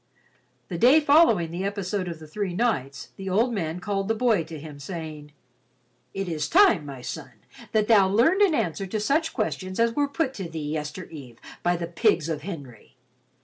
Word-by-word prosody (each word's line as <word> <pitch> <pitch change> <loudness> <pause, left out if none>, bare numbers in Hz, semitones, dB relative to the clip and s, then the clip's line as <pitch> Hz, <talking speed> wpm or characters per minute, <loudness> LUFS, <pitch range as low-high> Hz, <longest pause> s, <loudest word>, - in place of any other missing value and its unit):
The 175 -3 -4
day 260 - +7
following 290 - +4
the 175 +3 -4
episode 200 -1 -2
of 170 -2 -5
the 160 - -12
three 185 +3 -4
knights 140 - -1
the 195 0 -5
old 225 +6 +2
man 170 -4 -3
called 195 +1 -2
the 225 - +1
boy 220 -6 +2
to 160 0 -8
him, 150 -1 -10
saying, 155 -1 -7 0.8
"It 195 -1 -3
is 155 -3 -2
time, 260 - +5
my 135 -3 -8
son, - - -7 0.4
that 215 -1 +2
thou 205 -4 +6
learned 260 - +3
an 380 -6 +5
answer 195 - -1
to 215 +3 -2
such 310 +10 +1
questions 185 -4 -3
as 230 0 +3
were 290 -1 +2
put 280 -1 -1
to 190 -8 -6
thee 155 -2 -4
yestereve 150 -5 -7 0.2
by 175 0 +2
the 170 - -3
pigs 170 -1 +1
of 155 -2 -2
Henry. 140 - -9
185 Hz, 190 wpm, -25 LUFS, 160-225 Hz, 0.8 s, day